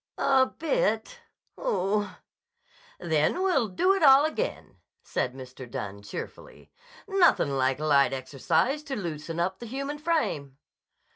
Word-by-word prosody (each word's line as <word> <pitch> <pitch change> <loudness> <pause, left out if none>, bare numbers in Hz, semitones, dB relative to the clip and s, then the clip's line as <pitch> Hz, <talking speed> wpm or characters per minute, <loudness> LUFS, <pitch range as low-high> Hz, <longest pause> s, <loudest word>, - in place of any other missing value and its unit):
"A 265 -1 +4
bit! - - -1 0.4
Oh 210 - 0
h - - -10
h - - -17 0.9
h!" - - -6
"Then 155 - +2
we'll 320 - +2
do 365 - +2
it 390 - -1
all 275 -1 +7
again," 450 +11 -4 0.3
said 125 0 -2
Mr. 130 -1 -10
Dunne 100 -2 -6
cheerfully. 295 - -9 0.4
"Nothin' 350 - +3
like 130 0 +1
light 145 -2 +3
exercise 135 - 0
to 275 -3 -4
loosen 165 - -5
up 185 +2 -1
the 235 - -8
human 275 +4 -4
frame." 280 - -1
210 Hz, 140 wpm, -27 LUFS, -, 0.9 s, all